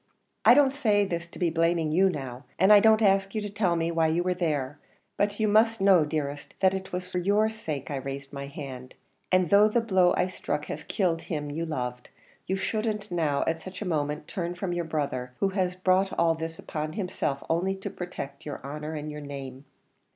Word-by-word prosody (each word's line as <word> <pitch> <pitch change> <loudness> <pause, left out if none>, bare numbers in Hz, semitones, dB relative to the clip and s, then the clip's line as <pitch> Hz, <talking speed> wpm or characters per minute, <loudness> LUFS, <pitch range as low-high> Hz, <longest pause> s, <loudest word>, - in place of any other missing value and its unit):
I 240 - +9
don't 275 -2 +5
say 215 -8 +2
this 170 -2 -3
to - - -12
be 175 -3 +1
blaming 165 -1 +1
you 190 +4 +4
now, 135 -5 -6
and 190 +4 +6
I 205 - +9
don't 220 +1 +5
ask 195 0 +3
you 215 - 0
to 205 -1 -5
tell 200 -4 +1
me 165 0 0
why 165 -1 +2
you 165 +2 +1
were 180 0 +1
there; 145 -5 -2 0.4
but 205 +1 0
you 215 - +2
must 225 +2 +4
know, 190 -5 +5
dearest, 145 -1 -4
that 190 -1 +4
it 190 0 -5
was 180 0 -4
for 180 0 -2
your 205 +4 +2
sake 155 - -5
I 140 - -2
raised 135 +1 -6
my 140 0 -5
hand; 130 -3 -8 0.4
and 185 -2 +3
though 205 +1 +7
the 215 +3 +2
blow 190 -6 +3
I - - +3
struck 150 -5 -3
has 155 - -5
killed 170 -5 0
him 150 -3 -4
you 165 +3 -3
loved, 125 -5 -4 0.4
you 190 - 0
shouldn't 215 0 -2
now 155 -5 +1
at 165 0 0
such 185 +3 -7
a - - -5
moment 150 -2 -1
turn 175 -1 -3
from 180 0 -3
your 175 -1 -2
brother, 140 -5 -3
who 195 - +2
has 185 -2 -1
brought 185 +1 +2
all 165 -1 +4
this 160 0 -5
upon 155 0 -4
himself 180 -8 -2
only 180 +4 0
to 195 - -6
protect 175 -6 -7
your 145 - -5
honer 150 +3 -5
and 150 0 -5
your 150 0 -7
name." 135 -1 -8
170 Hz, 215 wpm, -27 LUFS, 150-195 Hz, 0.4 s, I